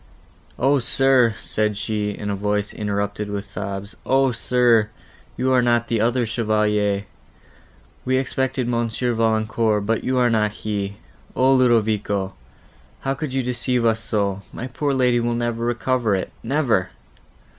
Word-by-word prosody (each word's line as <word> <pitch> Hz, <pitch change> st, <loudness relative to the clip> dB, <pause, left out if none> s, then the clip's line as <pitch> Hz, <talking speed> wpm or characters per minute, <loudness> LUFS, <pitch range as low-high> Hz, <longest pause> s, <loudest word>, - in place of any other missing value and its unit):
"O, 135 Hz, +3 st, +3 dB
sir!" 125 Hz, -2 st, +3 dB
said 105 Hz, -1 st, -1 dB
she, 105 Hz, -1 st, -2 dB
in 105 Hz, 0 st, -4 dB
a -, -, -1 dB
voice, 105 Hz, +1 st, -1 dB
interrupted 105 Hz, 0 st, -2 dB
with 100 Hz, 0 st, -4 dB
sobs; 100 Hz, 0 st, -6 dB
"O, 135 Hz, 0 st, +3 dB
sir! 115 Hz, -2 st, +3 dB, 0.5 s
you 130 Hz, +1 st, +1 dB
are 125 Hz, -, +5 dB
not 120 Hz, -1 st, +1 dB
the 115 Hz, -2 st, +1 dB
other 120 Hz, +2 st, +2 dB
Chevalier. 105 Hz, -2 st, 0 dB, 1.0 s
We 130 Hz, 0 st, +1 dB
expected 130 Hz, -1 st, -1 dB
Monsieur 120 Hz, 0 st, -1 dB
Valancourt, 110 Hz, -1 st, +1 dB
but 115 Hz, +1 st, 0 dB
you 130 Hz, 0 st, 0 dB
are 125 Hz, -1 st, +3 dB
not 105 Hz, -1 st, 0 dB
he! 100 Hz, -2 st, -2 dB, 0.4 s
O 130 Hz, +1 st, +4 dB
Ludovico! 110 Hz, -6 st, +2 dB, 0.7 s
how 135 Hz, -, -1 dB
could 135 Hz, +1 st, -4 dB
you 135 Hz, 0 st, 0 dB
deceive 125 Hz, 0 st, 0 dB
us 115 Hz, -1 st, +2 dB
so? 100 Hz, -3 st, -1 dB
my 120 Hz, -, -6 dB
poor 140 Hz, +3 st, -2 dB
lady 125 Hz, -2 st, +2 dB
will 120 Hz, 0 st, 0 dB
never 120 Hz, -1 st, -2 dB
recover 120 Hz, -2 st, +1 dB
it—never!" 115 Hz, 0 st, -1 dB
115 Hz, 145 wpm, -22 LUFS, 105-125 Hz, 1.0 s, are